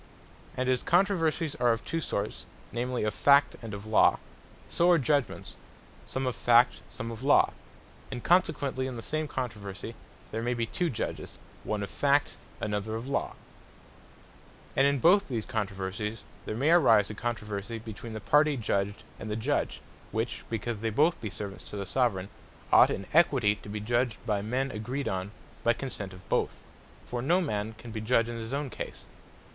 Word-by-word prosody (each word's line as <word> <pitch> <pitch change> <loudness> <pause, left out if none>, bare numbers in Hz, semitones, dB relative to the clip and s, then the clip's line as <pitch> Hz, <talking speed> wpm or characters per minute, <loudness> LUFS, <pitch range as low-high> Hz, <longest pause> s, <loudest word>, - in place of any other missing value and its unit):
And 130 0 0
as 130 -1 +2
Controversies 170 -4 +2
are 120 -1 +4
of 115 0 -2
two 165 - -2
sorts, 105 -7 -3 0.2
namely 125 +1 -1
of 105 -1 0
Fact, 140 +3 +5
and 115 -2 -7
of 100 +1 -7
Law; 110 0 +5 0.5
so 170 +1 +3
are 175 - +7
judgements, 140 -1 0 0.5
some 130 0 -2
of 125 - -1
Fact, 120 +1 +4
some 115 -2 -6
of 115 0 -7
Law: 140 +2 +4 0.6
And 125 -3 -6
consequently 145 -7 +2
in 130 - -5
the 115 - -6
same 155 +4 -2
controversie, 105 -9 -5 0.4
there 110 - -2
may 120 +1 0
be 115 -1 0
two 175 +9 -1
Judges, 125 - -4 0.3
one 105 -1 -2
of 100 - -5
Fact, 145 0 +2 0.2
another 105 +1 -2
of 115 +4 -5
Law. 140 - -1 1.4
And 135 - +5
in 140 0 +2
both 185 +9 +5
these 115 -5 -3
controversies, 105 +1 -3 0.2
there 110 - -2
may 145 +6 +3
arise 115 - +5
a - - -5
controversie 105 -1 -4
between 110 0 -8
the 110 - -4
party 145 +8 +3
Judged, 100 -3 -1 0.2
and 110 - -6
the 105 - -1
Judge; 130 +7 -1 0.3
which 115 +2 -2
because 115 0 -3
they 115 +1 -1
be 110 - -7
both 160 +3 +3
Subjects 100 -1 -7
to 105 - -6
the 100 - -3
Soveraign, 100 -4 0 0.4
ought - - +8
in 100 - -3
Equity 135 -10 +5
to 100 - -12
be 105 +1 -3
Judged 120 +2 0
by 105 -2 0
men 130 +6 -1
agreed 125 +6 -3
on 95 +1 -2 0.3
by 120 - +4
consent 110 -6 -5
of 90 -1 -13
both; - - +1 0.5
for 120 -1 -3
no 170 +8 +3
man 110 - -2
can 115 +1 -10
be 110 -1 -4
Judge 115 +1 +3
in 120 - -4
his 115 +1 -6
own 140 -1 -2
cause. - - -7
120 Hz, 180 wpm, -29 LUFS, 105-140 Hz, 1.4 s, ought